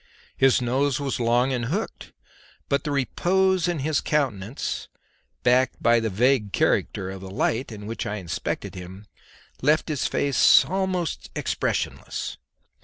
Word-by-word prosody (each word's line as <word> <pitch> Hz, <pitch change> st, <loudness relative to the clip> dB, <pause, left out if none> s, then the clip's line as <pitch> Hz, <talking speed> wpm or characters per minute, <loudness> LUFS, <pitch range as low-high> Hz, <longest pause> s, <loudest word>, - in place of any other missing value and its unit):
His 130 Hz, -1 st, +4 dB
nose 135 Hz, +2 st, +1 dB
was 140 Hz, -3 st, -2 dB
long 120 Hz, +3 st, +2 dB
and 120 Hz, -2 st, -1 dB
hooked, 195 Hz, -, -4 dB, 0.6 s
but 140 Hz, -1 st, +1 dB
the -, -, -1 dB
repose 180 Hz, -, +1 dB
in 175 Hz, -1 st, 0 dB
his 145 Hz, 0 st, 0 dB
countenance, 130 Hz, -6 st, -2 dB, 0.6 s
backed 125 Hz, +1 st, +3 dB
by 115 Hz, 0 st, +4 dB
the 115 Hz, -1 st, -1 dB
vague 110 Hz, +1 st, +2 dB
character 95 Hz, -1 st, +1 dB
of 95 Hz, -1 st, -8 dB
the 95 Hz, -, -8 dB
light 115 Hz, +6 st, -1 dB
in 105 Hz, -1 st, -8 dB
which 115 Hz, +2 st, -4 dB
I 105 Hz, -, -2 dB
inspected 90 Hz, -5 st, -4 dB
him, 95 Hz, +3 st, -9 dB, 0.6 s
left 150 Hz, +4 st, +2 dB
his 150 Hz, -4 st, 0 dB
face 140 Hz, -2 st, +5 dB
almost 185 Hz, -, -2 dB
expressionless. -, -, -2 dB
130 Hz, 140 wpm, -25 LUFS, 110-150 Hz, 0.6 s, face